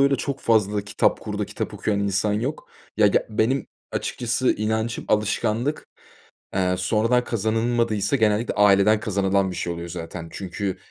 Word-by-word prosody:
öyle 140 0 +4
çok 140 +2 -3
fazla 105 -2 +2
kitap 100 - +1
kurdu, - - -3
kitap - - -5
okuyan 100 -2 -1
insan 100 +1 +1
yok. 125 +8 -3 0.3
Ya, 105 -1 +5
ge 100 - +2
benim, 115 +5 0 0.3
açıkçası, 125 +1 0
inancım 110 +2 -2
alışkanlık, 110 +6 0 0.7
eee, 90 -1 +1
sonradan 115 +6 +2
kazanılmadıysa, 115 0 0
genellikle, 110 -1 +2
aileden 105 +1 +5
kazanılan 100 -2 +1
bir - - -6
şey 85 0 -2
oluyor, 85 0 -7
zaten. 85 -1 -6
Çünkü 95 0 -4
105 Hz, 145 wpm, -23 LUFS, 100-115 Hz, 0.7 s, Ya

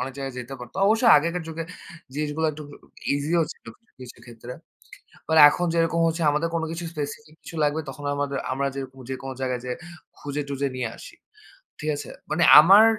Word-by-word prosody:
অনেক 135 - -3
জায়গায় 135 -2 -5
যেতে 125 +2 -7
পারত। 120 0 -11
অবশ্য 220 +3 +3
আগেকার 170 +4 0
যুগে 160 +1 -4 0.5
জিনিসগুলো 150 +2 -1
একটু 155 +1 -9 0.5
ইজিও 155 +4 +1
ছিল, - - -31 0.3
কিছু 125 -2 -11
ক্ষেত্রে। 120 +1 -10 0.8
মানে 160 0 +4
এখন 175 +4 -1
যেরকম 165 0 +1 0.3
আমাদের 150 +3 0
কোনো 165 -1 -1
কিছু 165 +1 -5
স্পেসিফিক 150 0 -6
কিছু 165 - -10
লাগলে, 150 +2 +1
তখন 145 +2 -8
আমাদের 140 -1 -2
আমরা 140 +1 0
জের 135 -1 -3 0.2
যেকোনো 135 0 -5
জায়গায় 125 -2 -2
যেয়ে 125 -1 -4 0.4
খুঁজে-টুজে 140 -1 -3
নিয়ে 125 -3 -2
আসি। - - -12 0.6
ঠিক 155 - -3
আছে? - - -7 0.2
মানে 160 +3 +2 0.2
আমার 195 +7 +8
145 Hz, 165 wpm, -24 LUFS, 135-160 Hz, 0.8 s, আমার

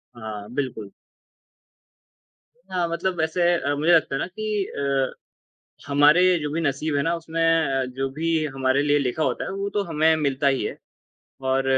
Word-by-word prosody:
हाँ, 110 -3 -7
बिल्कुल। 125 -7 -4 1.8
हाँ, 180 -2 0
मतलब 170 +2 -2
वैसे 160 +3 0
अ, 145 -4 -1
मुझे 155 +4 +2
लगता 160 -4 +3
है - - -1
ना - - -2
कि 210 +1 -2
अ, 140 -4 -1 0.7
हमारे 145 +4 +5 0.2
जो 150 -1 -3
भी 165 - -1
नसीब 150 0 -1
है - - +2
ना 165 +2 +1
उसमें 165 0 -4
अ, 160 -5 +2
जो 135 0 -1
भी 160 +3 -1
हमारे 130 +1 +2
लिए 145 0 +3
लिखा 140 +3 -1
होता - - -1
है, - - -5
वो 195 +1 -3
तो 205 0 -1
हमें 160 -2 +2
मिलता 140 -2 0
ही 135 -1 +1
है। - - -5 0.7
और 135 0 +2
150 Hz, 175 wpm, -24 LUFS, 135-165 Hz, 1.8 s, हमारे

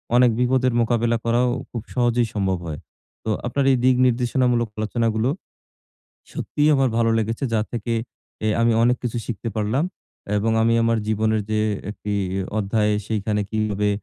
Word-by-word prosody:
অনেক 125 0 +6
বিপদের 125 0 +2
মোকাবিলা 115 0 +1
করাও 120 +2 +2 0.2
খুব 120 - -5
সহজেই 120 -1 +2
সম্ভব 95 -3 0
হয়। 75 -2 -5 0.4
তো - - -3 0.2
আপনার 140 +3 0
এই 130 - +3
দিক 130 0 +5
নির্দেশনামূলক 125 -1 +1
আলোচনাগুলো 110 +1 0 1.0
সত্যিই 150 +1 0
আমার 135 -2 +2
ভালো 115 -1 +3
লেগেছে 115 +4 -2
যা 110 - +3
থেকে 115 -1 -2 0.5
এ - - +2
আমি 115 0 +4
অনেক 125 +1 +3
কিছু 120 -1 -2
শিখতে 115 0 -4
পারলাম 110 +8 0 0.5
এবং 110 +2 +1
আমি 115 +1 +3
আমার 115 0 +2
জীবনের 110 0 +1
যে 110 0 +1 0.3
একটি 105 0 -5 0.4
অধ্যায় 105 +1 +1
সেইখানে 105 -1 -1
কিভাবে 105 -2 0
115 Hz, 150 wpm, -22 LUFS, 110-125 Hz, 1.0 s, অনেক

